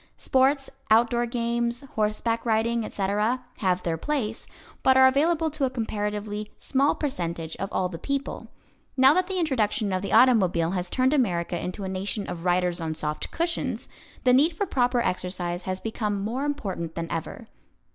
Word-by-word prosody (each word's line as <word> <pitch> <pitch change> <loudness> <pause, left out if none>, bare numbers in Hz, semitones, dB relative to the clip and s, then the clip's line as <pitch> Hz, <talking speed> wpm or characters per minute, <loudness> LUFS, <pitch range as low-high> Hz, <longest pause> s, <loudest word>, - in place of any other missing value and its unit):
Sports, 270 +1 +2 0.2
outdoor 235 +2 +4
games, 235 0 -1
horseback 220 +2 0
riding, 230 0 +1
etc., 210 +5 -1
have 185 -2 0
their 165 -1 -1
place, 225 - -3 0.3
but 260 0 +5
are 260 - +8
available 315 +4 +3
to 300 -1 -2
a 265 - +3
comparatively 210 -3 -3
small 275 +1 +1
percentage 170 - -3
of 195 - -3
all 185 - 0
the 170 -2 -8
people. 275 -1 -3 0.5
Now 265 +2 +7
that 365 +2 +1
the 380 -1 -3
introduction 225 - 0
of 185 - 0
the 200 - -4
automobile 185 -10 +4
has 180 -1 -1
turned 260 +2 +2
America 175 - 0
into 185 +3 -4
a - - -3
nation 195 +2 -3
of 170 0 -6
riders 180 -1 +1
on 160 -1 -2
soft 150 -1 -3
cushions, 335 0 -2 0.4
the 250 -2 +5
need 315 +6 +4
for 405 - 0
proper 245 -7 +1
exercise 180 -3 -2
has 185 0 -2
become 210 -2 -2
more 235 +8 -2
important 195 - -3
than 165 - -2
ever. 165 +7 -5
220 Hz, 165 wpm, -26 LUFS, 185-260 Hz, 0.5 s, are